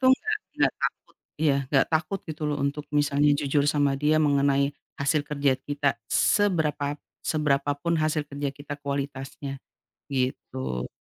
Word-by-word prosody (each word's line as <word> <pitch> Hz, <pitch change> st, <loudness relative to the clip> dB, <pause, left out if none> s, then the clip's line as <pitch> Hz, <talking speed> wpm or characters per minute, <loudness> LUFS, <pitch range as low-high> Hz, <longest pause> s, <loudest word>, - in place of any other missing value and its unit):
tuh 260 Hz, -, +5 dB
nggak 430 Hz, +9 st, -2 dB, 0.2 s
nggak -, -, +3 dB
takut. -, -, -3 dB, 0.3 s
Iya, 150 Hz, -3 st, +4 dB
nggak 135 Hz, -2 st, +4 dB
takut, 170 Hz, +4 st, 0 dB
gitu 155 Hz, -1 st, -7 dB
loh, 145 Hz, -, 0 dB
untuk 145 Hz, +1 st, -2 dB
misalnya 145 Hz, 0 st, +3 dB
jujur 145 Hz, 0 st, +1 dB
sama 145 Hz, -2 st, +3 dB
dia 150 Hz, +2 st, +3 dB
mengenai 140 Hz, -1 st, +3 dB, 0.3 s
hasil 145 Hz, +1 st, +1 dB
kerja 140 Hz, -3 st, +1 dB
kita. 145 Hz, 0 st, -1 dB
Seberapa 150 Hz, -, +2 dB, 0.3 s
seberapa 145 Hz, -2 st, +1 dB
pun 170 Hz, +2 st, +1 dB
hasil 155 Hz, 0 st, +1 dB
kerja 140 Hz, 0 st, -3 dB
kita 145 Hz, +1 st, -7 dB
kualitasnya, 140 Hz, -1 st, -4 dB, 0.5 s
gitu. 65 Hz, -, -2 dB
145 Hz, 140 wpm, -26 LUFS, 140-150 Hz, 0.5 s, tuh